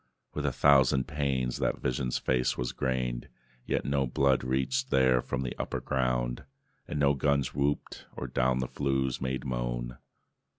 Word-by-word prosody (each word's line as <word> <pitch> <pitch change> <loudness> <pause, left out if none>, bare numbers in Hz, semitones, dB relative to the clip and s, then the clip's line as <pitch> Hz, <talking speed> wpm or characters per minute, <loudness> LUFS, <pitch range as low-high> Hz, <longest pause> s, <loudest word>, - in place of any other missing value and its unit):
With 75 -1 -2
a - - +2
thousand 65 -1 +4
pains 65 -4 -1
that - - 0
vision's 60 0 -1
face 65 -1 0
was 60 -1 -2
grained, 65 -2 -2 0.4
Yet - - 0
no 70 -1 +1
blood 65 +1 +2
reached 65 0 0
there 65 -2 +4
from 65 +2 -3
the 60 - -4
upper - - -2
ground, 60 -2 -1 0.4
And 75 - -4
no 70 -1 +4
guns 70 -1 +1
whooped, 70 +1 -2
or - - -4
down 65 0 +1
the 65 - -2
flues 65 -2 -1
made 65 0 -2
moan. - - -3
65 Hz, 160 wpm, -29 LUFS, 60-70 Hz, 0.4 s, thousand